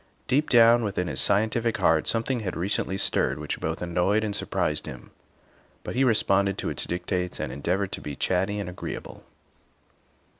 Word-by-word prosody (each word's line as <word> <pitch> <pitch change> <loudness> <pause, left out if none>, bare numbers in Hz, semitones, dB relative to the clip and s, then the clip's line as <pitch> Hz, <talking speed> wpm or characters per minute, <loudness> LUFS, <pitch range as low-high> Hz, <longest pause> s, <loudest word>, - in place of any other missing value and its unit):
Deep 145 +4 +1
down 120 -1 +6
within 95 -4 -1
his - - 0
scientific 110 +3 +2
heart 80 -1 +2
something 115 +2 0
had 95 -5 -4
recently 95 +1 -1
stirred 65 -7 +1
which 75 0 -4
both 80 +2 -3
annoyed 90 +5 +1
and 105 -2 -2
surprised 75 0 -1
him, 60 - -9 0.7
but - - -5
he 130 - +2
responded 100 -5 +2
to - - -2
its - - -4
dictates 90 0 -3
and - - -3
endeavored 90 +7 -1
to - - -5
be 75 -1 -6
chatty 95 +6 0
and 100 -3 -4
agreeable. 90 +1 -7
95 Hz, 165 wpm, -26 LUFS, 90-110 Hz, 0.7 s, down